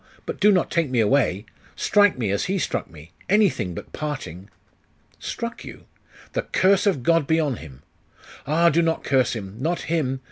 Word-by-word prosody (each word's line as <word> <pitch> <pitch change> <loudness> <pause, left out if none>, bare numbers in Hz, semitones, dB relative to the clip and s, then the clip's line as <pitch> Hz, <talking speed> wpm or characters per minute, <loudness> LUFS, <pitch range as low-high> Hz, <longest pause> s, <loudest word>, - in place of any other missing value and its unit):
but - - -5
do 210 +1 +5
not 180 -4 +1
take 165 -4 +1
me 125 -2 0
away! 110 -3 +2 0.3
Strike 205 -5 +3
me, 110 -6 -1
as 100 - 0
he 195 +1 -1
struck - - -2
me! 80 0 -14 0.2
anything 185 - +2
but - - -9
parting!' 120 - -6 0.7
'Struck 235 0 -5
you? - - -11 0.5
The - - 0
curse 195 +2 +2
of 170 -11 +1
God 165 -1 +2
be 160 0 +2
on 145 -7 0
him!' 70 -3 -12 0.6
'Ah, 170 +3 +4
do 165 +3 +3
not 165 -1 0
curse 130 -2 +2
him! 100 -3 -7
not 165 +6 -1
him! 140 -5 -1
150 Hz, 180 wpm, -23 LUFS, 110-170 Hz, 0.7 s, do